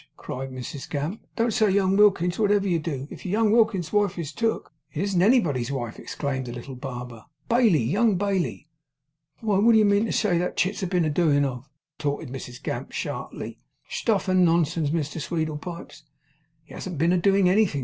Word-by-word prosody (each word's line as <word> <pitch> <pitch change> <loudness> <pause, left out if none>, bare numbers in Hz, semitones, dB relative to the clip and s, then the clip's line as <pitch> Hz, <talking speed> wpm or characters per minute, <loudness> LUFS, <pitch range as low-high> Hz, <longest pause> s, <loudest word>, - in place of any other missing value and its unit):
cried 135 +1 -6
Mrs 130 +2 -7
Gamp. 150 +9 -3
'Don't 230 0 +1
say 215 0 +3
young 190 0 +2
Wilkins, 190 -3 +3
wotever 205 -2 +2
you 175 -3 +1
do. 145 -4 -4
If - - -10
young 210 +3 +1
Wilkins's 215 -7 +2
wife 205 -3 +2
is 160 -4 -4
took 225 +6 -2
' - - -48
'It 150 - -4
isn't 195 -3 +1
anybody's 165 - +3
wife,' 120 -5 -4
exclaimed 130 -3 -4
the - - -5
little 125 +2 -8
barber. 125 -3 -7 0.2
'Bailey, 225 - +4
young 200 - +2
Bailey!' 190 -5 -1 0.7
'Why, 210 -4 +1
wot 230 +3 +5
do - - +6
you 215 - +5
mean 205 +2 +3
to - - -3
say 180 -6 +2
that 180 - -2
chit's 190 +3 0
been 180 -2 +1
a 155 - 0
doin' 145 -3 +3
of?' 130 +1 -5 0.3
retorted 145 0 -2
Mrs 125 -2 -8
Gamp, - - -4
sharply. - - -5 0.3
'Stuff 210 -5 0
and 185 -1 +4
nonsense, 165 -2 +2
Mrs 155 0 -2
Sweedlepipes!' 165 +1 -4 0.6
'He - - -15
hasn't 180 -4 -6
been 165 +5 +3
a 180 - +3
doing 195 +1 +3
anything! 185 -6 +3
175 Hz, 190 wpm, -25 LUFS, 145-200 Hz, 0.7 s, do